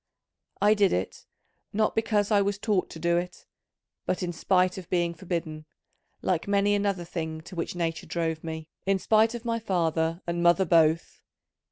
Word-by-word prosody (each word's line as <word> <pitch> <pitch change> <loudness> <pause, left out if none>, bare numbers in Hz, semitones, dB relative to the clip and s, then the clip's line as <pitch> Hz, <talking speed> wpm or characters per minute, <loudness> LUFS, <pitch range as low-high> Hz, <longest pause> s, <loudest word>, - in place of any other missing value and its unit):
I 210 +1 +5
did 205 -2 +3
it, 90 +1 -3 0.5
not 215 +1 +1
because 215 -2 +1
I 205 -1 +5
was 200 0 0
taught 205 -3 0
to - - -9
do 170 +1 +1
it, 180 +1 -5 0.6
but 185 - -1
in 175 -1 -2
spite 185 +2 +1
of 180 - -12
being 175 -2 +1
forbidden, 165 -3 -5 0.6
like 180 -1 0
many 200 0 +3
another 200 -3 0
thing 160 -2 -4
to 180 +3 -11
which 170 +1 -3
nature 165 -2 -2
drove 160 -2 -2
me, 160 -1 -6 0.2
in 195 0 +3
spite 220 +4 +3
of 240 0 -7
my 230 -1 0
father 165 -4 0
and 170 0 -2
mother 175 +2 +4
both. 160 -1 +2
180 Hz, 175 wpm, -27 LUFS, 165-200 Hz, 0.6 s, I